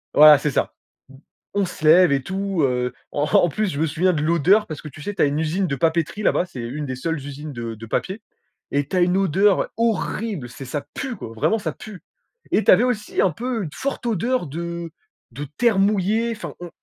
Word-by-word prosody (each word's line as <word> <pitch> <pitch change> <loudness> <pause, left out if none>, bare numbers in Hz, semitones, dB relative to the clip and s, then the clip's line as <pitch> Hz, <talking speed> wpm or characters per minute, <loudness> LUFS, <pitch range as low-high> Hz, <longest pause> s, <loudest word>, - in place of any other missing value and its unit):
voilà 150 -1 +9
c'est 150 - -1
ça. - - 0 0.9
On 200 - +2
se 155 -3 -7
lève 175 +1 +7
et 135 -1 +2
tout 195 -3 -2
heu. 125 -1 0 0.2
En 145 - 0
en 165 +3 +4
plus 215 +5 -1
je 140 - -4
me 160 - +2
souviens 170 +5 +1
de 150 - -1
l'odeur, 170 +6 +3
parce 155 - -7
que 150 - -8
tu 150 - -13
sais, 205 +3 -5
tu - - -1
as - - +6
une 145 +2 0
usine 175 +4 0
de 140 - -1
papeterie 165 +6 0
là-bas- 180 - +2
c'est 130 - -10
une 140 +6 -4
des 130 -1 -4
seules 165 +5 -2
usines 145 +1 -7
de 115 -1 -5
de 115 +2 -10
papier- 195 - -2 0.5
et 145 0 +1
tu 185 - -4
as - - +3
une 180 +1 +3
odeur 195 +2 +2
horrible 215 - -1
c'est 125 +2 -9
ça 145 +3 -4
pue 265 -3 -4
quoi! 120 - -8
Vraiment 220 - +1
ça - - -3
pue! 210 -4 -11 0.5
Et 215 - +3
tu - - +6
avais 215 +6 +6
aussi 225 -4 -1
un 185 - +3
peu 235 +3 -3
une 155 - -5
forte 275 -2 -4
odeur 230 - 0
de 170 +2 -5 0.4
de 145 +5 -6
terre 230 -5 +3
mouillée, 210 +3 +2
enfin 215 - -7
on 175 -1 -7
170 Hz, 230 wpm, -22 LUFS, 145-205 Hz, 0.9 s, voilà